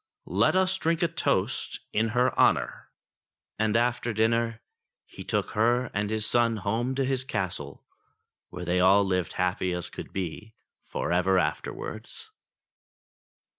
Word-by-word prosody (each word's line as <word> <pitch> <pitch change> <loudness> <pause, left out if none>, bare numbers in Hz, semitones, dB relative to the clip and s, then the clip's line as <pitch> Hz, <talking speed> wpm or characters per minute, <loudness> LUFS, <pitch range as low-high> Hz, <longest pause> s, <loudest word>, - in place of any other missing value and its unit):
Let 100 - +2
us 190 0 +3
drink 165 +1 +1
a - - +4
toast 165 - -1
in 110 +2 +2
her 125 +1 +3
honour." - - +2 0.7
And 110 0 +2
after 120 0 0
dinner 115 +1 +1 0.5
he - - -10
took - - -1
her 120 +3 +2
and 105 0 -1
his 110 -1 -1
son 115 -1 +2
home 115 +6 -1
to 135 0 +1
his 130 -1 0
castle, 95 - -4 0.6
where 90 0 -7
they 90 +1 +1
all 95 +2 +5
lived 90 -2 -1
as - - -11
happy 90 0 0
as 90 -2 -4
could - - -9
be 95 +4 -5 0.3
for - - -3
ever 90 +2 +3
afterwards. 110 - -4
110 Hz, 145 wpm, -27 LUFS, 95-120 Hz, 0.7 s, all